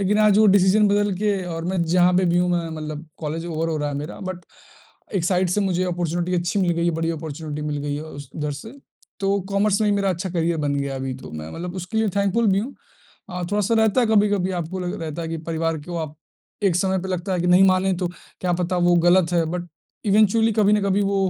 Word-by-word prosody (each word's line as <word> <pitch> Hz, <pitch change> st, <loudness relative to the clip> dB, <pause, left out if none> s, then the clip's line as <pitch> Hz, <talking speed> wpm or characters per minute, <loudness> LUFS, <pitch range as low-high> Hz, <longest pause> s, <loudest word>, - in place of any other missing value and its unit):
लेकिन 200 Hz, +2 st, +2 dB
आज 210 Hz, -1 st, +5 dB
वो 215 Hz, -, +6 dB
डिसीज़न 200 Hz, +2 st, +5 dB
बदल 205 Hz, 0 st, +2 dB
के 205 Hz, -2 st, 0 dB
और 165 Hz, 0 st, -5 dB
मैं 180 Hz, -1 st, 0 dB
जहाँ 180 Hz, +2 st, +3 dB
पे 185 Hz, -, +3 dB
भी 175 Hz, 0 st, +2 dB
हूँ, 180 Hz, 0 st, +2 dB
मैं 170 Hz, -2 st, 0 dB
मतलब 155 Hz, +1 st, -6 dB
कॉलेज 160 Hz, +2 st, -4 dB
ओवर 165 Hz, 0 st, -2 dB
हो 160 Hz, -, -1 dB
रहा 150 Hz, -1 st, -1 dB
है 145 Hz, -, -4 dB
मेरा, 150 Hz, +3 st, -6 dB
बट 185 Hz, -2 st, -5 dB, 0.7 s
एक 175 Hz, -3 st, 0 dB
साइड 185 Hz, 0 st, +2 dB
से 205 Hz, -, +1 dB
मुझे 185 Hz, -2 st, 0 dB
अपॉर्चुनिटी 175 Hz, 0 st, -1 dB
अच्छी 175 Hz, +3 st, 0 dB
मिल 180 Hz, -2 st, +2 dB
गई 170 Hz, 0 st, -1 dB
है, -, -, +3 dB
बड़ी 165 Hz, +1 st, -1 dB
अपॉर्चुनिटी 155 Hz, -1 st, -5 dB
मिल 150 Hz, -1 st, -2 dB
गई 145 Hz, 0 st, -2 dB
है 150 Hz, -, -5 dB
उस 145 Hz, -3 st, -10 dB
उधर 150 Hz, -1 st, -2 dB
से। 145 Hz, -, -9 dB, 0.5 s
तो 200 Hz, 0 st, +1 dB
कॉमर्स 200 Hz, +1 st, +1 dB
में 215 Hz, -, +2 dB
ही 205 Hz, -, +3 dB
मेरा 200 Hz, -1 st, +1 dB
अच्छा 185 Hz, +1 st, -3 dB
करियर 170 Hz, -1 st, 0 dB
बन 145 Hz, -1 st, 0 dB
गया 140 Hz, -1 st, -2 dB
अभी 130 Hz, -1 st, -3 dB
तो, 130 Hz, -, -10 dB
मैं 80 Hz, 0 st, -7 dB
मतलब 175 Hz, +2 st, -6 dB
उसके 185 Hz, +4 st, -3 dB
लिए 220 Hz, -1 st, +2 dB
थैंकफुल 200 Hz, +3 st, +2 dB
भी 195 Hz, -, +2 dB
हूँ। 250 Hz, +7 st, -4 dB, 0.6 s
अ, 180 Hz, 0 st, -4 dB
थोड़ा-सा 210 Hz, +2 st, +1 dB
रहता 220 Hz, +2 st, +3 dB
है 240 Hz, -, +3 dB
कभी-कभी 205 Hz, -3 st, +2 dB
आपको 170 Hz, +3 st, -5 dB
लग 180 Hz, -1 st, -4 dB
रहता 160 Hz, +1 st, -4 dB
है 165 Hz, -, -4 dB
कि 165 Hz, -, -3 dB
परिवार 165 Hz, 0 st, -1 dB
को 175 Hz, -, -4 dB
आप 155 Hz, -2 st, -5 dB, 0.5 s
एक 180 Hz, -4 st, +3 dB
समय 190 Hz, +1 st, +1 dB
पे 190 Hz, -, -5 dB
लगता 185 Hz, +1 st, -2 dB
है 180 Hz, -, 0 dB
कि 175 Hz, -, 0 dB
नहीं 180 Hz, +2 st, +6 dB
माने 190 Hz, 0 st, +3 dB
तो 175 Hz, -, +1 dB, 0.3 s
क्या 180 Hz, -1 st, 0 dB
पता 180 Hz, +1 st, -1 dB
वो 175 Hz, -, +5 dB
गलत 180 Hz, -1 st, +4 dB
है 170 Hz, -1 st, +3 dB
बट 175 Hz, 0 st, -4 dB, 0.4 s
इवेंचुअलि 220 Hz, +2 st, +4 dB
कभी 210 Hz, -1 st, +3 dB
ना 210 Hz, -, +4 dB
कभी 200 Hz, 0 st, +1 dB
वो 200 Hz, 0 st, 0 dB
180 Hz, 250 wpm, -22 LUFS, 165-200 Hz, 0.7 s, वो